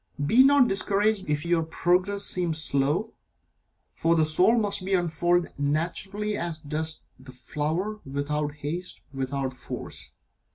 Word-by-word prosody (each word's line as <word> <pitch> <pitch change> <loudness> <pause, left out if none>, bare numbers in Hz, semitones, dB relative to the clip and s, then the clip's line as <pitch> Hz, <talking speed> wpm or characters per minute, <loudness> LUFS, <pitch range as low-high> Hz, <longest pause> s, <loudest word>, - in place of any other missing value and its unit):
Be 235 - +6
not 275 -2 +6
discouraged 200 -1 +1
if 150 +1 0
your 170 -1 +2
progress 180 +5 +1
seem 175 -3 0
slow, 155 +7 0 0.8
for 165 +1 +2
the 160 -1 +4
soul 185 +9 +4
must 205 -3 +1
unfold 175 -2 +1
naturally 180 +8 -1
as 170 -4 -2
does 155 +1 -3 0.2
the 130 0 -12
flower, 155 - -3
without 145 +2 -2
haste, 160 +5 -5
without 135 0 -2
force. 130 - -6
170 Hz, 125 wpm, -26 LUFS, 150-195 Hz, 0.8 s, Be